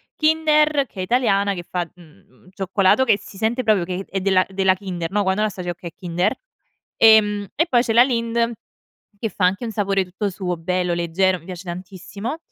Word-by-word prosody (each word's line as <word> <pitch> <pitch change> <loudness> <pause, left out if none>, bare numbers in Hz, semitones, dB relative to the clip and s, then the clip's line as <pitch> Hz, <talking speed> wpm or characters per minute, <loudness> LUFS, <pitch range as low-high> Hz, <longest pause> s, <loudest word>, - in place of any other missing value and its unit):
Kinder, 305 -3 +2
che 190 - -12
è - - -1
italiana 200 -3 +2
che 175 - -5
fa, 175 0 -4
mhmm, 155 - -21
cioccolato 190 +5 +2
che 220 -5 +3
si 195 - -13
sente 225 +4 0
proprio 215 -6 +2
che 180 - -4
è - - -14
è - - +1
della 185 -1 +3
della 190 -1 +2
Kinder, 185 -3 -5
no. 205 - +1
Quando 190 +1 0
la 215 - +2
assaggi, 180 -3 -6
"okay 175 -1 -6
è - - -54
Kinder". 175 -1 -1 0.6
Ehm, 210 -2 +5
e 330 +4 +1
poi 240 -4 +3
c'è 230 -3 -1
la 235 - +7
Lindt 235 -2 0 0.7
che 225 - -2
fa 195 - -2
anche 195 +6 -1
un 225 - -4
sapore 195 -2 0
tutto 195 +3 -3
suo, 180 -2 -3
bello, 180 +1 -1
leggero, 175 +2 +1
mi 165 - -20
piace 185 -1 -8
tantissimo. 190 - -6
195 Hz, 205 wpm, -21 LUFS, 180-225 Hz, 0.7 s, la